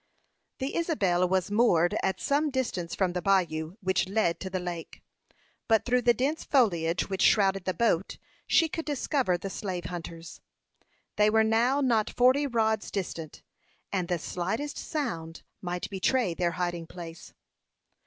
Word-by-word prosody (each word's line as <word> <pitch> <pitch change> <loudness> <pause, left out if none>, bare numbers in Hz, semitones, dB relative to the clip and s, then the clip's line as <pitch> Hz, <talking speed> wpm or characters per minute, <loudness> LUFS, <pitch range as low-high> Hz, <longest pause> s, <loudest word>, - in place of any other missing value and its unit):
The 265 +1 -3
Isabel 195 - +1
was 190 0 0
moored 190 -6 +3
at 190 -1 -1
some 295 +2 +1
distance 190 -11 -2
from 185 -3 0
the 180 - -2
bayou, 175 -4 +1
which 190 -1 +1
led 195 -5 +1
to 190 - -5
the 185 0 -2
lake; 175 -2 -7 0.6
but 225 -2 +3
through 250 0 +2
the 240 0 +5
dense 280 +7 -1
foliage 175 - +2
which 190 -1 -3
shrouded 195 -3 +3
the 185 - 0
boat, 195 -3 +1 0.3
she 330 - +4
could 325 0 -5
discover 270 - 0
the 195 +2 -6
slave 180 -3 -4
hunters. 165 -1 -7 0.8
They 210 0 +5
were 220 +1 +4
now 235 +6 +2
not 230 -5 +2
forty 260 +4 +3
rods 220 -4 0
distant, 170 -5 -5 0.5
and 185 -3 -1
the 175 - 0
slightest 190 - -3
sound 170 - -4 0.2
might 180 -1 -3
betray 195 +1 +1
their 170 0 -1
hiding 175 -2 -3
place. 165 -2 -10
190 Hz, 155 wpm, -28 LUFS, 175-245 Hz, 0.8 s, the